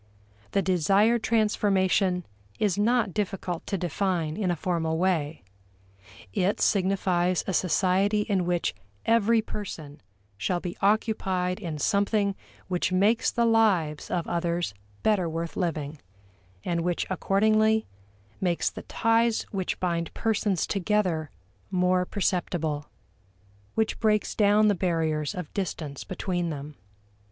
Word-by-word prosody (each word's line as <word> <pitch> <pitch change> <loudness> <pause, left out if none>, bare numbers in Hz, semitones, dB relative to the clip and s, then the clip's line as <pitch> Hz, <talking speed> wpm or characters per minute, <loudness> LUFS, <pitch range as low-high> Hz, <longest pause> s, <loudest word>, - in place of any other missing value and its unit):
The 195 - +2
desired 195 +6 +3
transformation 195 -5 +2 0.3
is 205 -4 +1
not 220 -1 +2
difficult 195 -4 -3
to 195 - -1
define 175 -2 -1
in 200 -3 -1
a 175 - +1
formal 160 -1 -1
way. 165 -4 0 0.9
It 190 - +1
signifies 185 -2 +1
a 190 - -2
society 190 +4 +2
in 195 -4 0
which 175 -1 0 0.3
every 230 0 +3
person 160 -10 -7 0.4
shall 175 - 0
be 175 -1 -5
occupied 195 -3 +1
in 165 -7 -4
something 200 +4 +1 0.3
which 180 -1 0
makes 205 +5 +3
the 235 -1 +1
lives 200 -10 +2
of 175 -2 -1
others 170 - -1 0.3
better 195 -6 +2
worth 165 +1 -4
living, 155 -4 -2 0.7
and 170 -1 0
which 175 0 -1
accordingly 215 +4 +2 0.5
makes 175 -3 0
the - - -8
ties 230 0 +1
which 190 -3 -2
bind 170 -2 -1
persons 210 -5 0
together 185 -6 0 0.4
more 180 0 +2
perceptible 165 -6 -1 0.9
which 220 -1 0
breaks 215 -2 +1
down 210 0 +4
the 205 - +4
barriers 160 -5 -1
of 180 -4 -6
distance 160 -7 -4
between 175 -2 -2
them. 150 -1 -6
185 Hz, 120 wpm, -27 LUFS, 170-210 Hz, 0.9 s, down